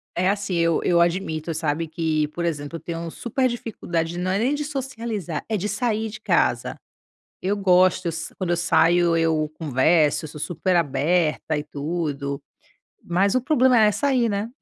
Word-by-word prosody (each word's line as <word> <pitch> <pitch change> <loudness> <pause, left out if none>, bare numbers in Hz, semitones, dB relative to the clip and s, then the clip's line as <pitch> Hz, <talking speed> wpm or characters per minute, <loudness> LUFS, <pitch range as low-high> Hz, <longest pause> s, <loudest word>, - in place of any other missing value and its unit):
É 185 +2 +2
assim, 200 -2 -1
eu 170 -1 +2
eu 170 -1 +3
admito, 170 -2 -1
sabe, 160 +1 -1
que 155 -1 0
por 170 +3 -5
exemplo, 150 -1 -3
eu - - -11
tenho 170 0 -5
super 255 +6 -1
dificuldade 175 -8 -3
de 175 - -5
não 185 +1 -1
é 195 - +1
nem 260 +6 +1
de 295 - -3
socializar, 230 - -4
é 220 - -1
de 205 +3 -3
sair 225 -3 -1
de 210 - -9
casa. - - +1 0.7
Eu 195 +2 0
gosto, 185 -1 +3
s 160 0 -4
quando 180 -2 -2
eu 170 - +1
saio, 170 0 +3
eu 160 -2 +1
converso, 155 +2 +2
eu - - -8
sou 150 - -10
super 180 +1 -1
aberta 155 0 +1
e 150 - -3
tudo. 145 -2 -3 0.6
Mas 190 +5 +1
o 255 - +3
problema 260 -4 +4
é 210 -1 +5
sair, 250 +1 +1
né? 205 +2 -2
175 Hz, 180 wpm, -23 LUFS, 160-205 Hz, 0.7 s, é